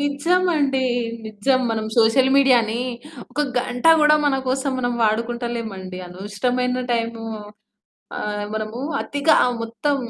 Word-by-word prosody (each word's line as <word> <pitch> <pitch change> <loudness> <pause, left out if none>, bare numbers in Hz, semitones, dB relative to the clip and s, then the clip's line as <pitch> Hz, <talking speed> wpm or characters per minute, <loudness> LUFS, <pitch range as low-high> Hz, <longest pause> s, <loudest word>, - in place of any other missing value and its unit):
నిజమండి. 285 -1 +1 0.5
నిజం 235 +5 0
మనం 220 -1 -2
సోషల్ 235 +4 +4
మీడియాని 240 -5 +3 0.5
ఒక 295 - -2 0.2
గంట 245 +2 -1
గూడా 300 0 +6
మన 285 -2 +3
కోసం 270 +1 0
మనం 245 -1 -1
వాడుకుంటలేమండి, 225 -4 -2
అనవసరమైన 245 +7 -2
టైము 230 -1 -2 1.0
ఆహ్, 210 0 -3
మనము 215 +2 -4 0.2
అతిగా 285 +2 +2
ఆ - - +2 0.2
మొత్తం 230 +6 -1
245 Hz, 115 wpm, -21 LUFS, 220-275 Hz, 1.0 s, గూడా